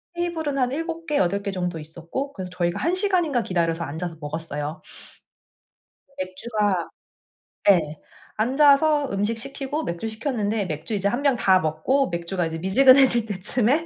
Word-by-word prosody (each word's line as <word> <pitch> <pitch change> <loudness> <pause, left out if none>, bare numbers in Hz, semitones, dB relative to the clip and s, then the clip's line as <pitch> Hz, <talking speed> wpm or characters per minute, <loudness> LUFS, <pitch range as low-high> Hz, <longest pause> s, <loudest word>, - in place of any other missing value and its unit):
테이블은 325 -5 -2
한 250 -1 +1
7 330 +2 -4
개 295 - 0
8 200 +2 +1
개 200 - -4
정도 180 -3 -3
있었고, 170 - -6
그래서 185 -5 -7
저희가 175 -1 -1
1 340 - 0
시간인가 360 - +1
기다려서 170 -3 -1
앉아서 160 +3 -5
먹었어요. 150 0 -5 1.3
맥주가 190 0 -2 0.8
네 160 -6 +3 0.4
앉아서 285 +4 +4
음식 205 +3 -1
시키고 275 +4 -4
맥주 170 +6 -4
시켰는데 220 -3 -2
맥주 155 +5 -4
이제 200 -1 0
1 245 +6 -2
병 280 -3 +3
다 190 -5 +4
먹고 160 - 0
맥주가 170 +1 -2
이제 165 0 -4
미지근해질 255 +6 +5
때쯤에 225 - +1
210 Hz, 310 characters per minute, -24 LUFS, 175-275 Hz, 1.3 s, 미지근해질